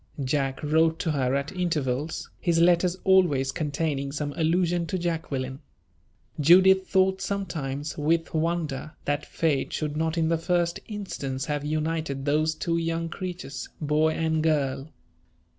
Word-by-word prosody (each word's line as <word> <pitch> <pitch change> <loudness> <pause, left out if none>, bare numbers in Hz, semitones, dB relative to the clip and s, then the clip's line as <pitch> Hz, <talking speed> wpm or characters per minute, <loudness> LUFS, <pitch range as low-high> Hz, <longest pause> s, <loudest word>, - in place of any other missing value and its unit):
Jack 135 0 -1
wrote 160 +2 +3
to 165 - -1
her 135 -3 +1
at 140 +1 -2
intervals, 155 -5 -2
his 170 -2 +1
letters 175 +1 +4
always 170 -9 +4
containing 145 -1 -2
some 145 0 -3
allusion 170 +1 +1
to 190 - -2
Jacqueline. 145 -7 -3 0.8
Judith 190 +5 +6
thought 190 0 +2
sometimes, 155 -8 -3
with 165 +2 +1
wonder, 155 -3 -1
that 145 +1 -1
Fate 150 -5 0
should 150 -1 -2
not 160 +2 -1
in 160 -1 +2
the 165 0 +1
first 170 0 0
instance 145 -11 -4
have 145 -1 -2
united 155 -2 -2
those 155 +2 +2
two 170 +1 -1
young 165 0 -1
creatures, 175 -7 -6
boy 155 +1 +2
and 160 -1 0
girl. 145 -2 0
160 Hz, 140 wpm, -26 LUFS, 145-170 Hz, 0.8 s, Judith